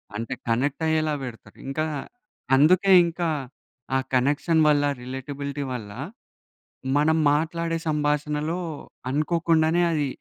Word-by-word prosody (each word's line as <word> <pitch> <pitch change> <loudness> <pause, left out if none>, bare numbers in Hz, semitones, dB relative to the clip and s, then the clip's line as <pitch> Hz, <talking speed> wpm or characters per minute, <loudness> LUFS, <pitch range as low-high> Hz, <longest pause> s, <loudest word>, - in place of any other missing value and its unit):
అంటే 115 +1 -3
కనెక్ట్ 130 +7 0
అయ్యేలా 155 -1 +1
పెడతారు. 120 -3 -9
ఇంక, 135 +3 -4 0.8
అందుకే 180 +8 +5
ఇంకా 170 0 -2 0.7
ఆ - - +5 0.2
కనెక్షన్ 145 +5 +2
వల్ల 145 -1 +4 0.2
రిలేటబిలిటీ 140 +3 -5
వల్ల 105 -4 -6 1.1
మనం 160 +2 +3 0.2
మాట్లాడే 165 +2 -1
సంభాషణలో 150 +2 0 0.5
అనుకోకుండానే, 165 +2 +2
అది 150 -3 0
150 Hz, 100 wpm, -25 LUFS, 140-165 Hz, 1.1 s, అందుకే